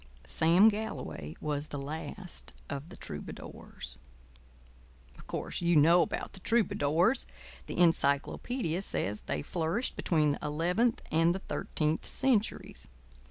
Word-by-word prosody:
Sam 165 - +5
Galloway 135 - -2
was 150 0 -2
the 145 - -4
Last 160 +6 -6 0.2
of 140 +3 -5
the 190 - -11
Troubadours. 60 -4 -8 1.2
Of - - -15
course - - -4
you 175 0 +3
know 165 +4 +7
about 160 - -2
the - - -8
troubadours. 190 - +2 0.4
The - - -5
encyclopædia 170 - +2
says 105 - -1
they 75 - -1
flourished 170 - -1
between 155 -4 +2
the 145 - -2
eleventh 175 +10 +1
and 165 +2 +4
the - - -3
thirteenth 155 -3 -2
centuries. 245 -5 0
165 Hz, 120 wpm, -31 LUFS, 145-190 Hz, 1.2 s, know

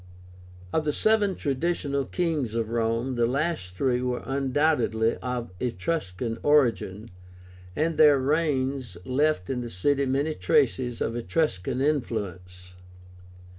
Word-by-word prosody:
Of 160 - +2
the 150 -1 0
seven 210 -1 +2
traditional 140 -1 -1
kings 155 - -1
of 115 -2 -1
Rome, 115 +2 0
the 120 -1 +3
last 135 - -2
three 125 +3 +1
were 125 -1 -2
undoubtedly 135 -4 +1
of 125 -4 -4
Etruscan 115 - -2
origin, 115 -8 +2 0.6
and 160 +1 0
their 150 -2 +7
reigns 135 - 0
left 140 -6 +1
in 125 -2 -2
the 120 - -5
city 140 +9 +1
many 140 +4 0
traces 120 +3 +1
of 115 - -1
Etruscan 120 - -1
influence. 90 - -3
130 Hz, 120 wpm, -26 LUFS, 115-150 Hz, 0.6 s, their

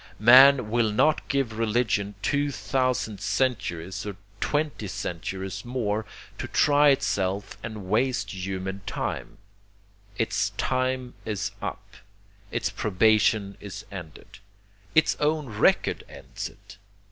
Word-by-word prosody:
Man 125 +1 +7
will 115 -2 +2
not 150 +8 +2
give 125 -6 -1
religion 110 -3 0
two 145 0 +1
thousand 130 -7 -1
centuries 95 -9 -1
or 105 -2 -5 0.2
twenty 145 -7 -1
centuries 95 +2 -5
more 110 -4 -2 0.3
to - - -3
try 145 0 +4
itself 100 -7 0
and 110 -3 -6
waste 125 +6 +1
human 95 +1 -4
time; - - -4 0.8
its - - 0
time 130 -1 -1
is 105 -2 -3
up, - - -6 0.5
its - - -2
probation 105 0 +2
is 100 -2 -8
ended. 90 -3 -10 0.6
Its 155 - +4
own 150 0 +1
record 105 - +2
ends - - -7
it. - - -17
110 Hz, 110 wpm, -26 LUFS, 100-130 Hz, 0.8 s, Man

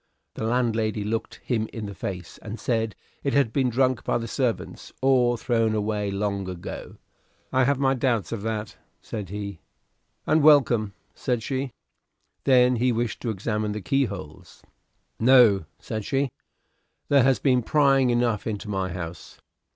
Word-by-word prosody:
The - - -5
landlady 110 -3 0
looked 110 +2 -3
him 110 -3 -1
in 110 -2 -5
the 100 - -6
face, 90 -2 -6
and 110 +1 -7
said 115 -3 -1 0.3
it 140 - 0
had 135 -6 +2
been 130 -2 +2
drunk 130 0 +1
by - - +1
the 115 -1 -4
servants 125 0 -2
or 125 -2 +3
thrown 115 -2 +1
away 105 -1 -1
long 100 -1 -2
ago. 90 -2 -7 0.6
"I 130 0 +4
have 140 +1 +2
my 135 0 +2
doubts 120 -7 0
of 115 -3 -3
that," 110 -1 -4 0.2
said 105 -5 -6
he. 100 -2 -5 0.7
"And 155 - +3
welcome," 125 -9 +4 0.2
said 120 -3 -2
she. 135 +1 -2 0.8
Then 125 -2 +5
he 125 +2 +2
wished 115 -2 -2
to 120 - -2
examine 105 0 -2
the 105 - -4
keyholes. 100 - -3 0.6
"No," 115 -7 +6
said 110 -1 -5
she; 135 +3 0 0.8
"there 140 -1 +6
has 130 +1 +4
been 125 -3 +2
prying 135 0 +3
enough 120 -3 +1
into 105 -1 -4
my 95 -2 -2
house." 85 -1 -7
115 Hz, 155 wpm, -25 LUFS, 105-130 Hz, 0.8 s, No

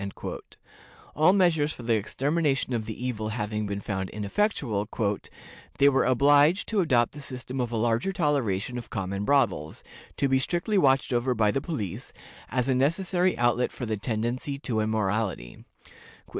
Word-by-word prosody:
All 155 +4 +5
measures 170 -6 +2
for 125 - -10
the 115 0 +1
extermination 135 +5 0
of 115 -2 -1
the 115 +3 -5
evil 110 -4 -2
having 105 -1 -3
been 100 0 -4
found 95 -2 -3
ineffectual, 105 - -1 0.9
"they 140 0 +6
were 135 -1 +2
obliged 145 - +4
to 220 - +1
adopt 125 -8 +2
the 145 - -10
system 130 -1 -5
of 120 -1 -2
a 115 - -1
larger 115 - +1
toleration 125 - 0
of 120 - -11
common 100 0 -3
brothels, 100 - +1 0.3
to 140 - +2
be 130 0 +3
strictly 180 +8 0
watched 135 -4 +3
over 120 +1 +1
by 110 -2 +3
the 135 - -1
police, 110 - -5 0.4
as 125 +1 0
a 135 - +3
necessary 175 +7 +1
outlet 120 +1 +2
for 125 - -6
the 110 -1 -1
tendency 120 +6 -3
to 125 -6 -2
immorality." 110 - -1
125 Hz, 155 wpm, -27 LUFS, 110-145 Hz, 0.9 s, they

